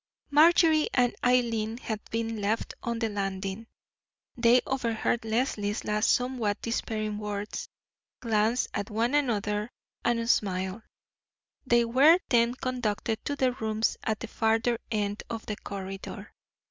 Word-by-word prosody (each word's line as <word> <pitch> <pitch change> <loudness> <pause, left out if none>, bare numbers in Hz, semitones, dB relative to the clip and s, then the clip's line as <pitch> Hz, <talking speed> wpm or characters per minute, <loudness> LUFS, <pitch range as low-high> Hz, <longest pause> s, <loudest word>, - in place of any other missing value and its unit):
Marjorie 315 +1 +5
and 245 -2 +3
Eileen 230 -3 +2
had 220 -4 -4
been 225 -1 -2
left 210 +3 -1
on 235 -2 -2
the 225 -1 0
landing. 195 +1 -4 0.7
They 240 +1 +5
overheard 235 -3 -1
Leslie's 220 -2 -1
last 210 +1 +2
somewhat 245 -5 0
despairing 215 -2 -2
words, 210 0 -4 0.5
glanced 225 +1 +1
at 205 - -3
one 230 +4 0
another, 210 -6 0 0.3
and 230 -1 +1
smiled. 190 -2 0 0.9
They 240 -1 +4
were 275 +8 +6
then 235 0 +3
conducted 230 -4 -2
to 285 - -1
their 260 -2 +2
rooms 220 -2 -1
at 220 -1 -2
the 230 - -4
farther 225 +2 +1
end 205 -2 -1
of 225 -2 -5
the 210 - -3
corridor. 195 -1 -7
225 Hz, 130 wpm, -28 LUFS, 210-245 Hz, 0.9 s, were